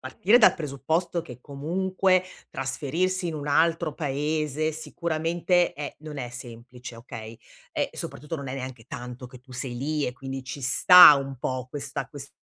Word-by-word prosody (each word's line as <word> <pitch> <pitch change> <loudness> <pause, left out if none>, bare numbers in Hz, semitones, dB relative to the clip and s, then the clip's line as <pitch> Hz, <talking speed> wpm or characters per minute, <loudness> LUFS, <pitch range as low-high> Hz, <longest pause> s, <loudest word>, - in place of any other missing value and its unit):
partire 185 - +3
dal 220 - +6
presupposto 160 +4 -2
che 125 -7 -11
comunque 185 +7 0 0.3
trasferirsi 160 +8 -2
in 165 - -3
un 145 -1 -5
altro 165 +1 +2
paese 150 +1 -1
sicuramente 170 +2 0
è 145 0 -6
non 155 -1 -9
è 125 -3 -5
semplice, 120 0 -10
okay? 115 -1 -9 0.3
Ehm, - - -1
soprattutto, 150 +5 -6
non 140 -2 -7
è 130 - -4
neanche 130 -3 -7
tanto 125 +1 -8
che 125 +1 -13
tu 130 0 -16
sei 125 -1 -5
lì 150 +3 -1
e, 125 - -4
quindi, 135 -1 -6
ci 135 +2 -7
sta 150 +5 +9
un 135 -1 -5
po' 130 0 -3
questa 145 0 -5
ques 140 -1 -9
145 Hz, 165 wpm, -26 LUFS, 130-160 Hz, 0.3 s, sta